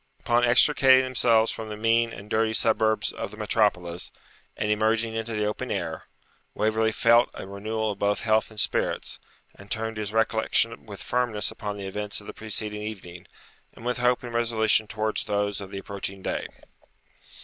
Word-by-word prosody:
Upon 120 0 +2
extricating 130 +2 +6
themselves 115 -3 +3
from 110 -1 -6
the 105 - -5
mean 115 +1 +2
and 100 - -9
dirty 110 +1 +1
suburbs 110 -1 +2
of - - -5
the - - -12
metropolis, 85 0 0 0.5
and 105 - 0
emerging 110 +1 +1
into 115 0 -3
the 105 0 0
open 105 - -3
air, - - -3 0.5
Waverley 110 +1 +2
felt 115 +2 +4
a - - -7
renewal 110 +3 -2
of 100 - -8
both 100 0 +1
health 110 -1 +2
and 110 -1 -8
spirits, - - 0 0.3
and 100 +1 -15
turned 110 -1 -2
his 105 -1 -3
recollection 110 +1 +1
with 100 -2 -8
firmness 120 -4 -1
upon 105 -1 -5
the 100 - -6
events 105 +2 -3
of 105 - -12
the - - -7
preceding 105 -1 -4
evening, 90 -5 -8 0.5
and 115 - -13
with 125 0 -1
hope 125 0 +2
and 120 -1 -7
resolution 115 -2 +2
towards 110 0 -1
those 100 -1 -1
of 95 - -8
the 100 - -7
approaching 100 -1 -6
day. - - -2
110 Hz, 175 wpm, -26 LUFS, 105-115 Hz, 0.5 s, extricating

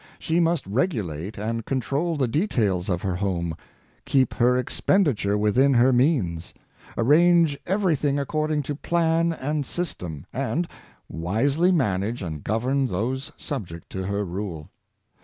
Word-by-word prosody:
She 165 +2 0
must 165 -2 +1
regulate 100 - -2
and 115 +2 -2
control 140 +7 -1
the 135 -3 +1
details 110 - 0
of 90 -2 -1
her 95 -3 -1
home, 85 -4 -2 0.5
keep 130 -3 +2
her 125 +1 +3
expenditure 125 - +1
within 125 +6 +3
her 125 +2 +5
means, 120 - +1 0.4
arrange 165 +4 +4
everything 165 -7 +1
ac 140 - -1
cording 155 0 -1
to 145 - -3
plan 165 +2 +1
and 150 -1 -2
system, 90 - -5
and 140 +7 -1 0.4
wisely 135 - +1
manage 110 - 0
and 80 -4 -5
govern 130 +6 0
those 125 +7 -2
subject 85 - -6
to 95 0 -4
her 100 +1 -1
rule. 90 -4 -5
125 Hz, 135 wpm, -24 LUFS, 100-155 Hz, 0.5 s, her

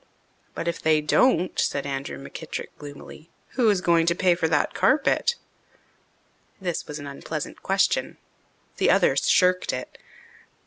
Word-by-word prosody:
"But 165 - -4
if 170 - -2
they 155 -1 +3
don't," 180 - +2
said 140 - 0
Andrew 135 - -4
McKittrick 70 0 -7
gloomily, 145 +2 -11 0.2
"who 240 -4 +2
is 200 -3 +2
going 170 -2 +3
to 170 - +3
pay 180 -1 +3
for 170 -1 0
that 150 -2 +1
carpet?" 305 - +2 1.2
This 180 -3 -3
was 150 - -6
an 145 - -8
unpleasant 145 +2 -6
question. 195 - 0 0.6
The - - +2
others - - +3
shirked 185 - +3
it. 125 0 -7
170 Hz, 140 wpm, -24 LUFS, 145-190 Hz, 1.2 s, they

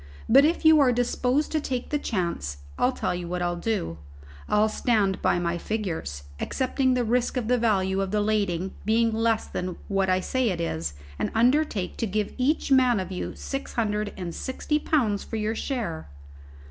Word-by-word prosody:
But 275 +5 +7
if 325 +1 0
you 315 -1 +8
are 270 -3 +5
disposed 250 +4 0
to 310 - 0
take 255 -3 -3
the 295 - +1
chance, 170 - -2 0.2
I'll - - +2
tell - - -2
you 175 -1 -4
what 180 0 -2
I'll 175 0 0
do; 170 - -2 0.5
I'll 210 +1 +4
stand 215 -3 +1
by - - +2
my 175 0 -1
figures, 165 - -3 0.2
accepting 260 0 0
the 250 - +1
risk 245 +3 0
of 240 -3 -1
the 250 0 +2
value 195 -4 +1
of 195 - -1
the 210 +2 +1
lading 200 -4 0
being 225 +1 +2
less 225 0 +1
than 180 -1 -4
what 195 -1 +1
I 185 0 +3
say 255 +5 0
it 180 -3 -2
is, 80 - -2 0.2
and - - 0
undertake 235 - +2
to 230 - -1
give 210 +1 -2
each 280 +3 +1
man 255 -4 +5
of 185 0 -4
you 185 - -4
six 275 0 -5
hundred 210 -2 -1
and 175 -3 -5
sixty 300 - -2
pounds 230 -11 +1
for - - -6
your 215 0 -1
share." 225 - -3
215 Hz, 190 wpm, -26 LUFS, 185-250 Hz, 0.5 s, you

